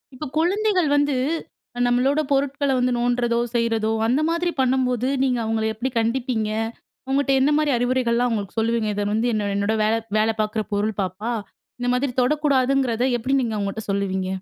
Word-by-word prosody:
இப்ப 300 - -6
குழந்தைகள் 370 +1 +2
வந்து 290 -1 +2 0.6
அ - - -3
நம்மளோட 255 +4 +2
பொருட்கள்ல 280 0 +1
வந்து 250 0 +1
நோண்டுறதோ! 240 -1 +1 0.2
செய்றதோ! 225 -2 +1 0.2
அந்த 255 +6 +2
மாதிரி 340 +1 0
பண்ணும்போது, 255 -1 +1 0.2
நீங்க 250 -2 +1
அவுங்கள 220 0 -1
எப்பிடி 245 +4 -3
கண்டிப்பீங்க? 230 -1 -1 0.6
உங்கட்ட 275 +1 +1
என்னமாரி 295 +2 +2
அறிவுரைகள்லாம் 245 -1 +1
அவுங்களுக்கு 210 -2 -4
சொல்லுவீங்க. 225 0 0
"இத 205 - -1
வந்து 225 +3 +1
என்ன 210 -2 -1
என்னோட 200 +2 0
வேல, 215 +1 +2 0.2
வேல 215 +1 +3
பாக்குற 215 0 -1
பொருள் 205 +1 -1
பாப்பா! 190 +5 -3 0.5
இந்த 245 0 -1
மாதிரி 260 +1 0
தொடக்கூடாதுங்கிறத" 265 -3 +1
எப்பிடி 255 +4 0
நீங்க 230 -3 -2
அவுங்கட்ட 200 +1 -3
சொல்லுவீங்க. 190 -1 -1
245 Hz, 155 wpm, -22 LUFS, 220-270 Hz, 0.6 s, வேல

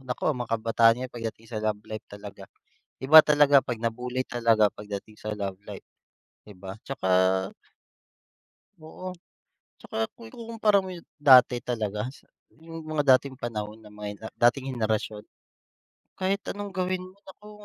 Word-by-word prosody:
Naku 125 - -4
mga 120 -2 -5
kabataaan 115 0 +4
ngayon 130 0 -6
pagdating 115 -1 -6
sa 110 -2 -4
love 105 -1 -1
life 110 -1 -7
talaga. 100 0 -10 0.6
Iba 155 +4 +9
talaga 145 -2 +5
pag 120 -2 -4
na-bully 125 +2 -2
talaga 115 -3 +3
pagdating 105 +1 -8
sa 110 - -6
love 100 -2 -4
life. - - -9 0.6
'Di 105 - -12
ba 95 0 -8
'tsaka 125 -8 -4 1.7
Oo. 175 +3 -9 0.7
'Tsaka - - -8 0.2
kung 115 - -13
ikukumpara 220 - 0
mo 185 - -7
yung 175 -2 -10
dati 130 -4 +7
talaga 105 -3 -2
sa - - -19 0.2
yung 165 0 -11
mga 145 -4 +4
dating 130 0 -5
panahon, 110 -3 -5
ng 105 -1 -16
mga 105 +1 -7
dating 130 +2 +2
henerasyon. 110 -2 -2 0.9
Kahit 190 +1 0 0.2
anong 205 0 -6
gawin 185 -1 -2
mo 185 +2 -13
naku, 210 +2 -14
120 Hz, 145 wpm, -26 LUFS, 110-155 Hz, 1.7 s, Iba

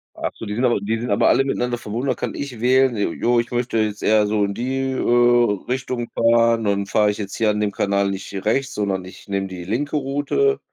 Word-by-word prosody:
Absolut, 110 - -5
die 105 - -2
sind 120 - -1
aber 120 -4 +2
die 110 +3 -2
sind 120 - -4
aber 100 - +3
alle 135 - +4
miteinander 125 -2 -1
verbunden. 120 +5 -4
Da - - +3
kann - - -4
ich 130 -5 -6
wählen: 130 0 +3
„J 100 -5 -1
ja, 120 0 +3
ich 115 - -2
möchte 120 -2 -1
jetzt 105 -1 -2
eher 105 -1 +3
so 105 -1 +1
in 100 - -3
die, 130 +4 -2
äh, 120 -4 +3
Richtung 125 -2 -3
fahren. 115 -1 +3
Und 100 0 0
fahre 105 0 +3
ich 105 - -2
jetzt 100 -2 -5
hier 110 -2 +1
an 105 0 0
dem 105 -1 0
Kanal 100 -2 0
nicht 95 0 -6
rechts, 135 +5 0
sondern 95 -3 -2
ich 95 - -13
nehme 100 -1 -2
die 90 -2 -8
linke 130 - -2
Route.“ 145 - 0
115 Hz, 235 wpm, -21 LUFS, 105-125 Hz, -, alle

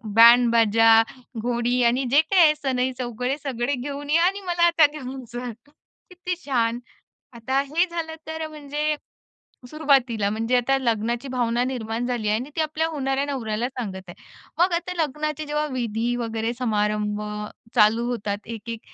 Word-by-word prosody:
बॅंड-बाजा, 230 -1 +6 0.4
घोडी 245 +1 0
आणि 245 +3 +2
जे 285 - +6
काही 360 +3 +3
आहे 305 -1 +6
सनई-चौघडे 255 -2 -2
सगळे 260 0 -1
घेऊन 285 +3 -6
या 335 +2 +4
आणि 395 +2 0
मला 345 -1 +1
आता 325 -2 +5
घेऊन 265 -3 -7
जा. 245 0 -4 0.6
किती 360 0 -4
छान. 235 -3 0 0.6
आता 260 +4 0
हे 305 +6 +1
झालं 330 -2 -5
तर 320 0 -4
म्हणजे 300 0 -2 0.7
सुरुवातीला 265 -9 +2
म्हणजे 225 +3 0
आता 270 +3 +2
लग्नाची 235 +1 -1
भावना 240 -1 0
निर्माण 240 -2 -3
झाली 240 -4 -2
आहे 215 +1 +2
आणि 265 +5 -7
ती - - 0
आपल्या 315 +1 0
होणाऱ्या 275 -2 -1
नवऱ्याला 240 -4 -2
सांगत 205 -8 -6
आहे. 175 - -9 0.4
मग 355 +1 +3
आता 350 +1 -2
लग्नाचे 305 +1 -3
जेव्हा 300 +1 -1
विधी 235 -1 -1
वगैरे 225 -1 -2
समारंभ 210 -3 0 0.5
चालू 225 +1 +4
होतात 205 -4 -2
1-1 230 0 -6
250 Hz, 150 wpm, -24 LUFS, 230-295 Hz, 0.7 s, बॅंड-बाजा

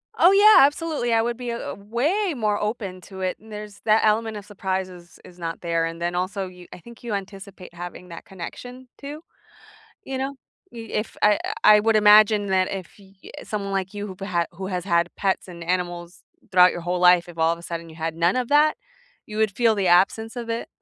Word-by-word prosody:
Oh, 355 - +6
yeah, 415 +2 +7
absolutely, 290 -4 -1
I 225 -1 +3
would 235 0 -2
be 250 -1 -5
a 235 0 -4
a - - -4
way 295 - -1
more 215 -4 0
open 210 -4 -4
to 190 +1 -10
it, 185 -1 -2
there's 210 -1 -10
that 220 0 +4
element 220 0 +1
of 205 - -9
surprise 190 -2 -3
is 175 -1 -15
is 180 0 -15
not 165 -1 -5
there, 165 -1 0
and 165 0 -5
then 175 +1 -1
also, 185 +2 -2
yo 180 -1 -13
I - - -11
think 235 +6 -15
you 235 -3 -4
anticipate 195 -2 -8
having 175 +1 -9
that 170 - -10
connection, 245 +8 -9
too, 290 +2 -8 0.8
you 270 - -5
know? 270 +1 -3 0.4
Y 240 - -10
if 210 +1 -3
I 210 0 +5 0.2
I 210 0 +8
would 225 +1 +2
imagine 210 0 +6
that 190 -1 +1
if 190 -4 -6
y 195 -1 -19 0.2
eh, - - -9
someone 200 -2 -4
like 190 0 -2
you, 205 0 -4
who 190 - -8 0.4
who 190 +2 -7
has 180 -2 -3
had 170 -2 +2
pets 195 -1 -1
and 170 -2 -9
animals, 175 0 -3 0.3
throughout 180 -1 +6
your 175 - -6
whole 175 +1 -2
life, 180 -1 +5
if 170 - -12
all 160 0 +3
of - - -8
a 170 - -13
sudden 170 -1 -6
you 160 - -13
had 160 0 -4
none 170 +2 +2
of 250 -2 -1
that, 300 +1 +4 0.5
you 215 - -8
would 220 0 +2
feel 230 -2 +3
the 195 -2 0
absence 200 +6 +3
of 235 -1 -6
it, 230 +1 -3
200 Hz, 220 wpm, -23 LUFS, 180-225 Hz, 0.8 s, I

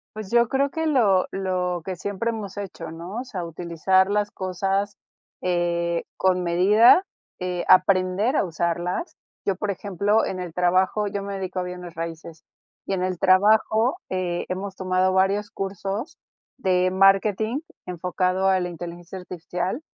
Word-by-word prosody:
Pues 215 -3 -7
yo 235 -1 +4
creo 275 +1 +1
que 320 0 -2
lo 210 -10 +3
lo 180 -2 -1
que 190 -1 -3
siempre 205 +5 -2
hemos 210 -3 -7
hecho, 175 -5 -6
¿no? 170 +6 -7
O - - -6
sea, 190 -8 -5
utilizar 175 +3 +1
las 210 0 0
cosas, 195 +2 -2 0.4
eh, 170 -1 0
con 185 -1 +2
medida, 205 - +5 0.4
eh, 180 -1 -2
aprender 185 +6 +4
a - - +3
usarlas. 175 - -2 0.3
Yo, 195 - +1
por 205 +3 -3
ejemplo, 200 +2 0
en 185 - -4
el 180 -3 -6
trabajo, 185 +4 +2
yo 200 0 -3
me 200 0 -5
dedico 185 -1 -4
a - - -1
bienes 180 -1 -7
raíces, 165 -1 -7 0.4
y - - -1
en 185 -1 -1
el 185 -2 -2
trabajo, 220 - +4
eh, 180 -2 -2
hemos 190 +1 -4
tomado 185 0 +1
varios 195 +2 +1
cursos 200 - -4 0.4
de 185 -6 +2
marketing 195 +6 +3 0.3
enfocado 180 +2 -1
a 190 -1 +3
la 180 - -2
inteligencia 175 +2 -8
artificial 180 - -4
185 Hz, 155 wpm, -24 LUFS, 180-205 Hz, 0.4 s, medida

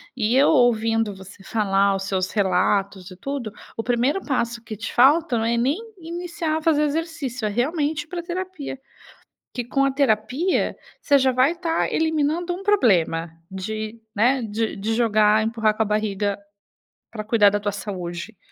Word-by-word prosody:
E 230 -1 +1
eu 275 +2 +5
ouvindo 225 -6 +2
você 190 +1 -13
falar 200 -2 +1
os 195 - -3
seus 190 -1 -1
relatos 195 -1 0
e 185 - -11
tudo, 260 +2 -5 0.3
o 225 - -2
primeiro 245 +9 +1
passo 235 -4 -1
que 220 -1 -7
te 225 +2 -6
falta 280 +1 +4
não 225 - 0
é 230 +1 +1
nem 260 +7 +1 0.2
iniciar 340 -2 -3
a - - -4
fazer 305 -2 +3
exercício, 295 -6 -3
é - - +1
realmente 295 +7 -1
ir - - -24
pra 350 +1 -5
terapia. 350 -5 -5 0.8
Que 245 - -4
com 275 +3 +1
a 275 - +2
terapia, 265 - 0 0.2
você 285 -1 +4
já 260 -1 +2
vai 255 +3 +3
estar 340 -1 -1
eliminando 320 +2 0
um 370 - -7
problema 190 - +2 0.2
de, 215 +4 -5
né, 245 +6 +3
de 220 +1 -2
de 215 +3 -2
jogar, 215 -2 +3
empurrar 220 -1 +1
com 220 - +1
a - - 0
barriga 205 -1 -1 0.7
pra 215 -2 -6
cuidar 210 -2 +4
da 205 +1 -1
tua 205 0 -2
saúde. 190 0 -6
230 Hz, 170 wpm, -23 LUFS, 210-290 Hz, 0.8 s, eu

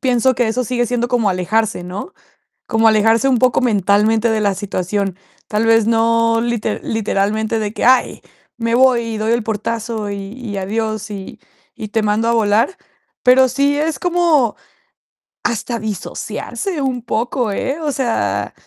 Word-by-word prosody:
pienso 255 0 +2
que 245 -1 +1
eso 250 +3 -1
sigue 240 0 0
siendo 240 0 -1
como 240 -5 +1
alejarse, 190 +2 -1
¿no?, 195 - -7 0.5
como 225 -1 +3
alejarse 225 +3 +3
un 250 -3 +2
poco 255 -2 +3
mentalmente 215 0 +2
de 220 -1 0
la 200 -2 +1
situación, 195 0 -2 0.3
tal 215 +1 0
vez 225 -1 +4
no 230 0 +2
lite 235 -2 -2
literalmente 220 +1 -1
de 210 -1 -3
que: - - -2
"Ay, 255 0 +3 0.4
me 230 0 0
voy 255 -1 +4
y - - -3
doy 215 +1 -1
el 235 -1 0
portazo 220 0 -3
y 200 - -3 0.2
y 235 -5 -6
adiós 215 +2 -3
y 195 -2 -8 0.4
y 215 - -7
te 225 +1 0
mando 215 +2 +1
a 235 - +2
volar", 225 - +2 0.5
pero 260 +1 +6
sí 280 +3 +1
es 315 +1 -1
como 335 -9 +2 0.9
hasta 235 0 -2
disociarse 225 - -4
un 260 -2 -1
poco, 235 0 -1
¿eh?, 270 +9 -2
o 300 -2 -1
sea, 105 - -1
225 Hz, 160 wpm, -18 LUFS, 210-245 Hz, 0.9 s, pero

